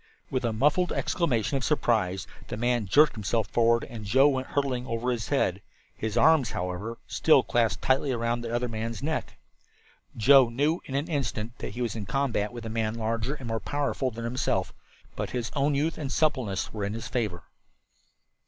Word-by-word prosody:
With 130 Hz, -1 st, -1 dB
a 120 Hz, -, +1 dB
muffled 150 Hz, +10 st, +2 dB
exclamation 135 Hz, -, 0 dB
of 135 Hz, -, -4 dB
surprise 105 Hz, -10 st, +1 dB, 0.2 s
the -, -, -5 dB
man 120 Hz, -2 st, 0 dB
jerked 150 Hz, +11 st, +5 dB
himself 110 Hz, 0 st, -1 dB
forward 115 Hz, 0 st, +3 dB
and 115 Hz, -3 st, -8 dB
Joe 130 Hz, +8 st, +5 dB
went 130 Hz, -2 st, -2 dB
hurtling 130 Hz, -3 st, -1 dB
over 120 Hz, +1 st, -1 dB
his 115 Hz, -3 st, -3 dB
head, 100 Hz, -9 st, +1 dB, 0.3 s
his 110 Hz, +1 st, -3 dB
arms, 145 Hz, -2 st, +5 dB
however, 90 Hz, +6 st, -4 dB
still -, -, +4 dB
clasped 115 Hz, -2 st, 0 dB
tightly 135 Hz, +2 st, +2 dB
about 120 Hz, -1 st, 0 dB
the 115 Hz, -1 st, -5 dB
other 120 Hz, +1 st, 0 dB
man's 115 Hz, +2 st, -4 dB
neck. 160 Hz, +2 st, -3 dB, 0.8 s
Joe 130 Hz, +2 st, +6 dB
knew 145 Hz, +8 st, 0 dB
in 135 Hz, -, -5 dB
an 145 Hz, +3 st, 0 dB
instant 125 Hz, -7 st, -2 dB
that 100 Hz, -, -6 dB
he 125 Hz, -, -2 dB
was 115 Hz, -3 st, -2 dB
in 105 Hz, -3 st, -5 dB
combat 120 Hz, -6 st, 0 dB
with 120 Hz, -2 st, -8 dB
a -, -, -3 dB
man 110 Hz, 0 st, -1 dB
larger 115 Hz, +4 st, -2 dB
and 130 Hz, -5 st, -8 dB
more 115 Hz, -1 st, -1 dB
powerful 145 Hz, -1 st, -1 dB
than 115 Hz, -1 st, -7 dB
himself, 115 Hz, -6 st, -1 dB, 0.4 s
but -, -, -3 dB
his 120 Hz, -1 st, -3 dB
own 140 Hz, 0 st, +2 dB
youth 155 Hz, +4 st, 0 dB
and 140 Hz, -3 st, -3 dB
suppleness 130 Hz, -, 0 dB
were 105 Hz, -2 st, -3 dB
in 100 Hz, +1 st, -2 dB
his 115 Hz, -, -5 dB
favor. 105 Hz, -9 st, -2 dB
120 Hz, 190 wpm, -27 LUFS, 110-135 Hz, 0.8 s, Joe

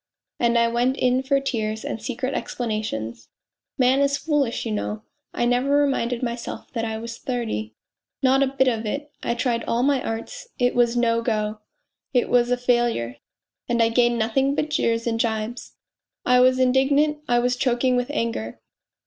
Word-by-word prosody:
And 235 Hz, 0 st, +3 dB
I 235 Hz, 0 st, +4 dB
went 245 Hz, +3 st, +1 dB
in 255 Hz, +1 st, +2 dB
for 275 Hz, +1 st, +2 dB
tears 220 Hz, -5 st, -3 dB
and 225 Hz, -, -4 dB
secret 255 Hz, +3 st, -3 dB
explanations. 210 Hz, -, -4 dB, 0.5 s
Man 260 Hz, +1 st, +4 dB
is 280 Hz, 0 st, +2 dB
foolish, 285 Hz, -7 st, 0 dB
you 225 Hz, -, -2 dB
know.... 210 Hz, 0 st, -3 dB, 0.3 s
I 240 Hz, -, -1 dB
never 245 Hz, +3 st, +1 dB
reminded 255 Hz, -4 st, 0 dB
myself 235 Hz, -1 st, -5 dB
that 230 Hz, -, -2 dB
I 220 Hz, -1 st, -2 dB
was 230 Hz, +1 st, -7 dB
thirty... 220 Hz, -, -3 dB, 0.5 s
not 265 Hz, +1 st, +4 dB
a 275 Hz, -, +4 dB
bit 265 Hz, 0 st, +1 dB
of 225 Hz, -3 st, 0 dB
it! 290 Hz, +6 st, -4 dB
I 235 Hz, -, -1 dB
tried 240 Hz, -1 st, 0 dB
all 235 Hz, +1 st, 0 dB
my 275 Hz, -1 st, +2 dB
arts. 230 Hz, -, -5 dB
It 245 Hz, 0 st, +2 dB
was 240 Hz, 0 st, +2 dB
no 230 Hz, -1 st, +2 dB
go. 215 Hz, -2 st, -1 dB, 0.6 s
It 245 Hz, -, +2 dB
was 245 Hz, -1 st, +3 dB
a 250 Hz, -, +2 dB
failure, 240 Hz, -, 0 dB, 0.5 s
and 240 Hz, 0 st, +1 dB
I 225 Hz, 0 st, +4 dB
gained 240 Hz, 0 st, +3 dB
nothing 265 Hz, +5 st, +1 dB
but 300 Hz, +1 st, -1 dB
jeers 230 Hz, -5 st, +1 dB
and 225 Hz, -1 st, -1 dB
gibes. 225 Hz, +1 st, -2 dB, 0.5 s
I 250 Hz, 0 st, +5 dB
was 255 Hz, +1 st, +5 dB
indig 260 Hz, +1 st, +3 dB
nant, 300 Hz, +1 st, +2 dB
I 240 Hz, -, +3 dB
was 245 Hz, +1 st, +2 dB
choking 250 Hz, 0 st, +1 dB
with 245 Hz, +1 st, 0 dB
anger. 230 Hz, -, -3 dB
240 Hz, 180 wpm, -23 LUFS, 230-260 Hz, 0.6 s, I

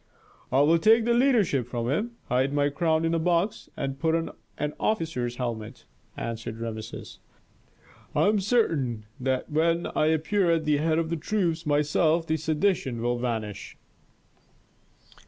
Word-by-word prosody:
"I 130 Hz, +2 st, +4 dB
will 160 Hz, +3 st, +4 dB
take 220 Hz, +5 st, +5 dB
the 235 Hz, -, +3 dB
leadership 225 Hz, -, +2 dB
from 120 Hz, -1 st, -3 dB
him, 210 Hz, -, -1 dB
hide 130 Hz, +3 st, +1 dB
my 145 Hz, 0 st, +2 dB
crown 160 Hz, +1 st, +1 dB
in 165 Hz, -, +1 dB
a 165 Hz, -, +1 dB
box, 175 Hz, +4 st, 0 dB
and 135 Hz, 0 st, -3 dB
put 160 Hz, +2 st, +2 dB
on 165 Hz, 0 st, -2 dB, 0.3 s
an 150 Hz, 0 st, -2 dB
officer's 160 Hz, -, -1 dB
helmet," 115 Hz, -4 st, -5 dB, 0.3 s
answered 115 Hz, -1 st, -5 dB
Rameses. 110 Hz, -1 st, -7 dB, 1.0 s
"I -, -, +3 dB
am 210 Hz, 0 st, +3 dB
certain 160 Hz, -, 0 dB
that 130 Hz, +1 st, -1 dB
when 165 Hz, +2 st, +1 dB
I 155 Hz, -, +3 dB
appear 160 Hz, +4 st, +1 dB
at 165 Hz, -1 st, +2 dB
the 150 Hz, -1 st, +3 dB
head 160 Hz, +2 st, +1 dB
of 165 Hz, 0 st, -1 dB
the 170 Hz, -, 0 dB
troops 170 Hz, -2 st, -1 dB
myself 150 Hz, +3 st, +2 dB
the 160 Hz, 0 st, 0 dB
sedition 155 Hz, -, 0 dB
will 120 Hz, +1 st, -1 dB
vanish." 110 Hz, -4 st, -4 dB
155 Hz, 155 wpm, -26 LUFS, 125-170 Hz, 1.0 s, take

